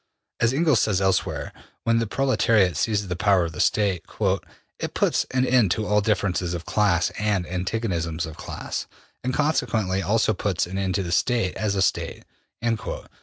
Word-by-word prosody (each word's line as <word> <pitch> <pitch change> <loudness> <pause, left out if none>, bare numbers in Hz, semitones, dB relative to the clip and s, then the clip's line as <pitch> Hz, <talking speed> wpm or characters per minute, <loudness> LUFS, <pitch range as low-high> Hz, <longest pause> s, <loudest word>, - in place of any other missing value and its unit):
As 120 0 +3
Engels 150 -3 +3
says 100 -4 +1
elsewhere, 95 -1 0 0.3
when 115 0 +3
the 115 - -1
proletariat 110 - +2
seizes 105 +4 0
the 90 - -2
power 100 -2 +3
of 80 - -4
the 80 - -9
State 100 -6 +1
``it - - -4
puts - - +1
an 130 0 +1
end 125 -6 +4
to 110 +5 0
all 105 0 +3
differences 95 -4 0
of 85 - -6
class 95 -5 +2
and 105 -4 +1
antagonisms 90 -3 -2
of 80 -2 -8
class, - - -5 0.4
and 130 - 0
consequently 115 -10 0
also 110 +4 +2
puts 95 -2 -1
an 95 +2 -4
end 95 -2 -1
to 100 - 0
the 85 - -4
State 115 0 +1
as 105 -2 -1
a 95 - +2
State.'' - - -1
100 Hz, 170 wpm, -24 LUFS, 90-115 Hz, 0.4 s, end